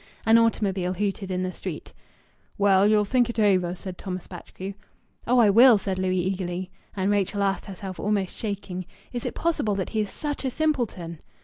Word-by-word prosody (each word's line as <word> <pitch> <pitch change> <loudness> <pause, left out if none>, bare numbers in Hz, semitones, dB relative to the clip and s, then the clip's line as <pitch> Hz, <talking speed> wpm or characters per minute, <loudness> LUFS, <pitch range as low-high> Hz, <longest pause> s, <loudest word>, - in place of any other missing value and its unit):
An 225 +1 +6
automobile 195 -5 +1
hooted 195 0 -2
in 185 0 -1
the 185 - -2
street. - - -7 0.6
"Well, 200 -1 +5
ye'll 210 -1 +4
think 245 +2 +2
it 235 - -5
over," 185 -5 +3
said 185 0 -8
Thomas 185 -2 -5
Batchgrew. 190 +2 -8 0.5
"Oh 250 +2 +4
I 220 -4 +6
will!" 235 +2 +8
said 190 -1 -3
Louis 185 0 +1
eagerly. 185 -1 -3 0.2
And 195 0 +1
Rachel 200 0 +1
asked 195 0 0
herself, 190 -1 -7
almost 200 -3 -1
shaking 195 -4 -4 0.3
"Is 240 - -3
it - - -5
possible 310 -11 0
that 190 -2 -2
he 220 - 0
is 210 - -3
such 290 -2 -4
a 265 - 0
simpleton?" 240 - -1
200 Hz, 185 wpm, -25 LUFS, 185-220 Hz, 0.6 s, will